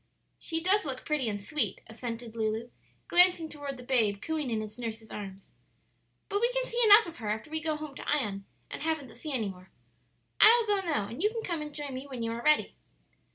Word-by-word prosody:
"She 325 -1 -2
does 395 +3 +4
look 265 -3 -4
pretty 295 -6 0
and 205 -1 -3
sweet," 295 +9 -1
assented 230 0 -6
Lulu, 220 +1 -2 0.4
glancing 355 -2 +4
toward 285 -3 -6
the 250 - -10
babe, 225 -6 +2
cooing 310 +1 -2
in 220 -2 -1
its 215 +2 -9
nurse's 225 -2 -6
arms, 195 -2 -8 0.8
"but 405 +1 -1
we 475 +1 +3
can - - +1
see 485 -1 -1
enough 430 +1 +9
of 335 -1 -9
her 220 -3 -4
after 220 +8 -3
we 315 0 -1
go 310 -1 0
home 300 -1 -6
to - - -7
Ion, 205 -9 0 0.3
and - - -6
haven't 315 -4 -1
the - - -14
sea 310 - -6
any 225 -7 0
more. 185 0 -11 0.7
I'll 460 +2 +8
go 410 -2 +2
now, 295 - 0
and 230 +8 -7
you 420 - +4
can 450 0 -5
come 340 -6 -2
and 300 0 -5
join 290 -2 -5
me 260 +2 -6
when 255 -4 -5
you 230 - -1
are 230 +1 -4
ready." 305 +4 +3
275 Hz, 225 wpm, -30 LUFS, 225-325 Hz, 0.8 s, enough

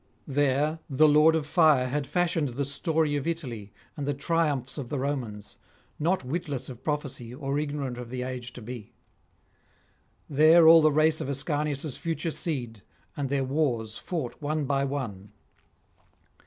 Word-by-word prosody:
There 145 +2 +1
the 150 +3 +5
Lord 150 +2 +6
of 160 -2 -1
Fire 150 -5 +4
had 140 +2 -2
fashioned 170 -2 0
the 135 +4 -3
story 155 +1 0
of 145 - -4
Italy 125 -12 -4 0.2
and 145 -1 -4
the 145 - 0
triumphs 145 -3 0
of 125 -4 -6
the 145 - -2
Romans, 125 -7 -4 0.4
not 170 +1 +1
witless 140 -3 -3
of 125 0 -10
prophecy 140 -5 -3
or 140 +1 -2
ignorant 145 -4 -3
of 120 -1 -7
the 125 0 -4
age 125 -1 -5
to 120 - -10
be; 120 -2 -8 1.3
there 160 +3 +6
all 165 0 +9
the 155 0 +4
race 155 +1 +3
of - - -4
Ascanius' 145 0 -2
future 165 0 -2
seed, 120 - -4 0.3
and 140 -2 -2
their 140 -1 +1
wars 130 -6 -1
fought 155 -9 -4
one 150 0 -1
by 135 0 +1
one. 105 -8 -5
145 Hz, 155 wpm, -27 LUFS, 130-155 Hz, 1.3 s, all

